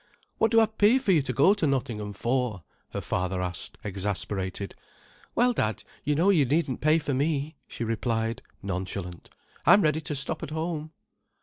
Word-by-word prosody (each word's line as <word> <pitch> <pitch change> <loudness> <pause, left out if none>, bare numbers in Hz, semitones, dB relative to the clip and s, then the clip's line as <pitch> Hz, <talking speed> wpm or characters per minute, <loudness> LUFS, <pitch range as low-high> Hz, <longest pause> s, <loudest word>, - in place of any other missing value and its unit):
"What 225 - +4
do 225 +1 +5
I 225 - +6
pay 220 +2 +4
for 255 -7 +1
you 165 -5 +5
to 135 - -2
go 140 - +5
to 200 -7 0
Nottingham 120 -7 -2
for?" 120 -3 -1 0.3
her - - -4
father 90 0 -1
asked, 90 -1 -3
exasperated. 100 -1 -2 0.6
"Well, 245 +1 +4
Dad, 110 - -1 0.2
you 150 +1 +1
know 180 +7 +4
you 165 -7 +4
needn't 140 -1 0
pay 155 +2 +4
for 150 -3 -2
me," 145 +2 0
she - - -5
replied, 115 +1 -1 0.2
nonchalant. 95 -2 -4 0.3
"I'm 205 - +7
ready 155 +1 +2
to 150 -1 -4
stop 140 +1 -3
at 165 - -5
home." 160 0 -3
135 Hz, 175 wpm, -27 LUFS, 105-160 Hz, 0.6 s, I'm